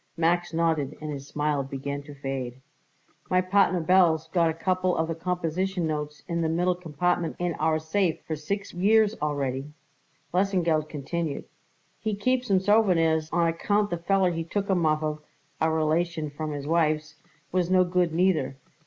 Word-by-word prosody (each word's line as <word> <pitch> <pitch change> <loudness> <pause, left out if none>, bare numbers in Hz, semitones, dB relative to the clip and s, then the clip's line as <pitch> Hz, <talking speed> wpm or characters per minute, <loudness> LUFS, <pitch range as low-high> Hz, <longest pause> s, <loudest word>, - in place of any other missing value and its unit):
Max 175 +1 +1
nodded 160 -4 0
and 155 0 -5
his 140 -1 -7
smile 150 -1 0
began 140 +1 -4
to 145 0 -11
fade. 135 -2 -4 0.7
"My 185 - +3
partner 185 0 +3
Belz 165 -2 +3
got 170 -2 +3
a - - -1
couple 185 +1 0
of 160 - +1
the 165 - -2
composition 180 +2 -2
notes 150 -1 -4
in 170 0 -1
the 160 - +1
middle 175 +3 +2
compartment 175 0 -1
in 175 -1 -1
our 155 0 +2
safe 160 +2 0
for 160 - -2
six 200 +7 -4
years 210 +4 +4
already," 140 -1 -2 0.6
Lesengeld 175 -5 +1
continued. 155 +1 -3 0.5
"He 220 -2 -2
keeps 250 +4 0
'em 190 -2 +4
for - - -12
sowveneers, 165 -7 +3
on 170 0 +2
account 205 +5 0
the 175 - 0
feller 190 +1 +2
he 165 -1 -2
took 200 +4 -2
'em 175 -4 +2
off 155 0 +1
of 155 0 -2 0.4
a 160 - +3
relation 160 0 0
from 155 +1 -4
his 145 -1 -5
wife's 155 -1 0 0.3
was 180 -1 +1
no 185 0 +5
good, 180 -1 +1
neither. 160 -6 +1
165 Hz, 170 wpm, -26 LUFS, 155-185 Hz, 0.7 s, no